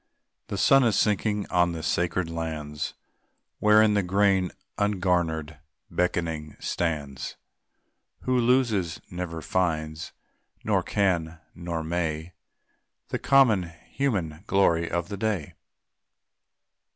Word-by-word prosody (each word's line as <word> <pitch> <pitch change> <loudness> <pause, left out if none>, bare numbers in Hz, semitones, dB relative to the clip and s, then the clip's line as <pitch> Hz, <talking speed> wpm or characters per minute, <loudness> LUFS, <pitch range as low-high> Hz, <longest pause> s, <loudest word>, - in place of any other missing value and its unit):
The 100 - -4
sun 135 +6 +5
is 115 -5 +2
sinking 105 0 +1
on 85 -1 +3
the 80 -1 -5
sacred 85 +1 0
lands 80 -3 -4 0.6
Wherein 105 0 +5
the 100 - +3
grain 95 0 +2 0.3
ungarnered 85 -6 0 0.3
beckoning 80 -4 -1
stands. 75 -6 -3 0.9
Who 130 - 0
loses 115 -8 +2
never 85 -3 -5
finds, 80 -2 -1 0.5
nor - - +2
can, 85 -5 0 0.2
nor 85 -2 -4
may, 80 0 -2 0.8
The - - -2
common, 110 -11 +4 0.2
human 95 - -1
glory 85 -4 +3
of 85 +2 -2
the 100 - -4
day. 100 -7 -2
90 Hz, 105 wpm, -26 LUFS, 80-100 Hz, 0.9 s, sun